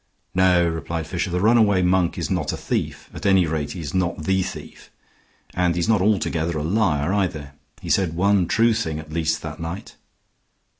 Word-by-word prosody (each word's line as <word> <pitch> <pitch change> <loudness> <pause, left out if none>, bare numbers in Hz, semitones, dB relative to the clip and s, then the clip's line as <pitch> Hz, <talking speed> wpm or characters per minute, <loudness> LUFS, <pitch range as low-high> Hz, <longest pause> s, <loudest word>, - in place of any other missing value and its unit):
"No," 90 -2 +4
replied 80 0 -3
Fisher, 85 +1 -3
"the 90 +1 -1
runaway 105 -2 +4
monk 90 -1 +2
is - - -3
not - - 0
a - - -4
thief. - - -3
At - - -9
any 95 -2 +4
rate 75 -2 -3
he 90 - -6
is 75 - -6
not 90 -4 -1
the 95 +3 +1
thief. - - -8 0.6
And 90 -2 +1
he's 85 +2 0
not 110 -4 +3
altogether 85 -5 0
a 75 - -2
liar, 85 -3 +1
either. 80 -8 -2 0.3
He - - -6
said 90 -5 +1
one 95 0 +2
true 115 0 +3
thing 95 -9 -2
at 75 0 -9
least 80 -1 -1
that - - -7
night." 85 +4 -7
90 Hz, 190 wpm, -22 LUFS, 80-95 Hz, 0.6 s, No